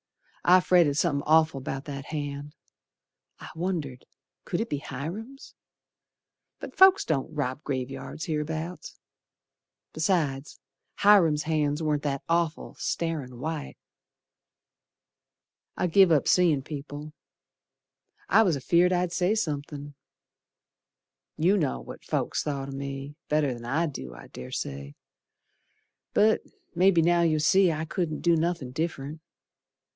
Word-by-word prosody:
I 180 +1 +7
fretted 175 -5 +3
somethin' 150 -4 +1
awful 155 -3 +4
'bout 135 +1 -5
that 140 -1 -6
hand 145 -1 -5 0.8
I - - -10
wondered, 160 -7 -3 0.4
could 175 - -2
it 225 - -3
be 145 - -1
Hiram's, 185 - -7 1.1
But - - -9
folks 380 +1 +6
don't 150 -2 -1
rob 140 -2 -3
graveyards 135 +2 -4
hereabouts. 160 +2 -4 1.0
Besides, 155 -4 -1 0.4
Hiram's 175 -7 +5
hands 150 -1 0
warn't 150 -2 0
that 140 -2 -2
awful, 165 -1 0
starin' 150 -7 -3
white. 155 +3 -5 2.0
I - - +1
give 185 +1 +5
up 150 -3 +3
seein' 165 -7 +3
people, 150 +1 -7 1.1
I 220 - +5
was 185 -8 +3
afeared 170 +6 +3
I'd 180 -1 +1
say 185 +4 +1
somethin'. 145 -6 -4 1.4
You 175 +6 +3
know 65 - 0
what - - -10
folks - - -1
thought 140 -2 -3
o' - - -6
me 140 +1 -6 0.2
Better'n 140 -6 0
I 150 +8 +1
do, 65 - -7
I - - -13
dessay, 70 +2 -6 1.2
But 215 +1 +4 0.3
mebbe 175 -1 +4
now 175 0 +4
you'll 160 -2 +2
see 185 +4 +4
I 155 0 -3
couldn't 165 -1 -3
do 170 -1 +4
nothin' 165 -5 -1
diff'rent. 155 0 -4
155 Hz, 120 wpm, -27 LUFS, 140-170 Hz, 2.0 s, I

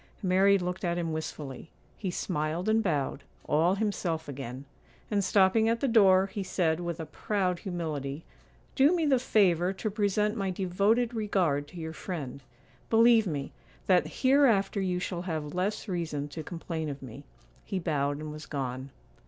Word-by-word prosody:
Mary 195 +2 +4
looked 180 0 -4
at 175 -1 0
him 165 -2 -2
wistfully; 155 -2 -6 0.3
he 195 - -4
smiled 170 0 -2
and 220 +1 +3
bowed, 145 -7 -1 0.2
all 165 +5 +3
himself 190 -6 -2
again; 135 -1 -7 0.5
and 200 -1 +2
stopping 200 +4 +4
at 230 0 +1
the 275 - 0
door, 195 -5 +5
he 200 +1 -5
said, 175 -3 0
with 170 -1 -4
a 160 - -4
proud 180 +2 -1
humility, 155 -6 -4 0.5
'Do 290 +6 +4
me 330 -2 +1
the 270 -4 +3
favour 185 -7 +3
to 210 +2 -3
present 210 +1 +1
my 195 -3 -1
devoted 200 +6 +1
regard 185 -10 0
to 175 - -13
your 160 -1 -5
friend; 145 -8 -6 0.5
believe 225 -1 +5
me, 145 -5 -3 0.3
that 185 -2 +1
hereafter 240 -8 +4
you 180 -2 0
shall 180 -1 -3
have 155 -5 -4
less 195 +5 -2
reason 165 -6 -2
to 160 +2 -6
complain 165 -1 -5
of 140 -1 -7
me.' 130 +3 -9 0.4
He 195 - -3
bowed 145 -5 0
and 155 0 -6
was 155 +1 -9
gone. 130 -2 -4
180 Hz, 165 wpm, -29 LUFS, 155-200 Hz, 0.5 s, door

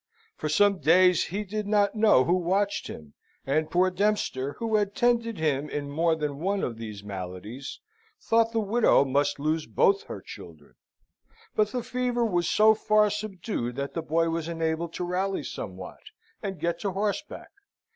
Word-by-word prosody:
For 155 - -4
some 200 +4 +3
days 180 +4 +4
he 200 +5 -3
did 210 +1 -4
not 205 -1 +2
know 215 - +5
who 170 - +1
watched 190 +3 0
him; 75 -2 -10 0.3
and 155 +3 0
poor 185 +2 +2
Dempster, 180 -9 0
who 225 -2 0
had 205 -1 -1
tended 235 -3 +1
him 150 -2 0
in 145 -1 -4
more 165 +2 +2
than 150 -3 -4
one 195 +4 -1
of 115 -2 -3
these 105 -3 -7
maladies, 100 +6 -7 0.4
thought 230 0 +2
the 225 - 0
widow 215 -8 +3
must 140 +2 +1
lose 155 +2 -1
both 195 0 +2
her - - -7
children; 80 -5 -12 0.8
but 215 - +3
the 245 0 -3
fever 250 -1 -1
was 175 -6 0
so 220 +1 +5
far 215 -1 +3
subdued 195 - -4
that 140 +1 -4
the 165 - -2
boy 165 +1 +1
was 165 -1 -2
enabled 165 0 -2
to - - -3
rally 185 0 -1
somewhat, 95 -7 -7 0.4
and 195 -3 -5
get 170 0 -1
to 195 0 -2
horseback. 210 +9 -3
175 Hz, 170 wpm, -27 LUFS, 145-210 Hz, 0.8 s, know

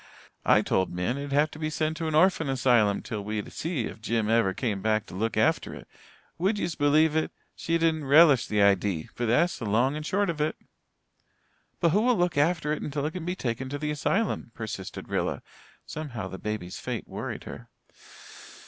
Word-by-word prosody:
I - - +5
told 95 -1 0
Min 90 +10 -2
it'd 140 0 -5
have 145 +2 +3
to 155 - -10
be 155 -1 -1
sent 155 0 -1
to 165 - -3
an 155 - -1
orphan 160 -2 +3
asylum 120 -6 +3
till 105 -4 -5
we'd 105 0 -4
see 160 -8 -2
if 110 - -8
Jim 110 -1 0
ever 115 -4 +3
came 105 -2 -2
back 110 0 +1
to - - -13
look 110 +5 -2
after - - +1
it. - - -12 0.5
Would 195 +5 +1
yez 175 - -2
believe 150 +2 +3
it, 160 - 0 0.2
she 165 0 0
didn't 160 -2 +1
relish 145 -2 +6
the 105 -1 +2
idee. 100 -4 +2
But 120 - -2
that's 145 +11 +2
the 115 - -4
long 125 +7 +2
and 155 - -4
short 200 +3 +1
of 155 -2 -5
it." 150 - 0 1.2
"But 170 - +3
who 205 +6 +3
will 245 0 +3
look 175 -2 +1
after 150 0 +2
it 155 - -4
until 145 0 -3
it 155 - -1
can 175 -1 -6
be 180 +1 -2
taken 130 -4 -3
to 145 - -3
the 150 +1 -2
asylum?" 150 - -1
persisted 110 -4 -6
Rilla. - - -2 0.4
Somehow 125 -11 -5
the 95 - -8
baby's 105 -4 -4
fate - - -4
worried - - -5
her. - - -10
145 Hz, 200 wpm, -27 LUFS, 110-160 Hz, 1.2 s, relish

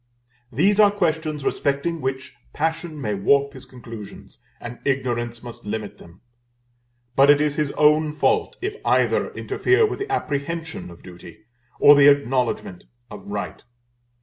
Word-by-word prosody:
These 195 - +2
are 210 -1 +7
questions 160 -6 -2
respecting 145 +4 -1
which 130 0 -4 0.2
passion 160 0 -3
may 105 -6 -2
warp 140 +8 +2
his 130 - -12
conclusions, 115 -5 -11 0.2
and 120 0 -9
ignorance 120 -3 -2
must 120 -1 -10
limit 105 0 -5
them; 85 +2 -16 0.9
but 135 +1 +5
it 145 0 +6
is 150 -1 +1
his 150 -1 -1
own 150 +1 +3
fault 150 - 0
if 410 +2 -3
either - - +1
interfere 405 +4 +1
with 425 - -4
the 405 0 -5
apprehension 160 - -3
of 85 - -15
duty, 90 +4 -13 0.4
or 145 - +8
the 145 0 +6
acknowledgment 130 -9 +1 0.3
of - - -10
right. - - -5
140 Hz, 145 wpm, -22 LUFS, 120-160 Hz, 0.9 s, or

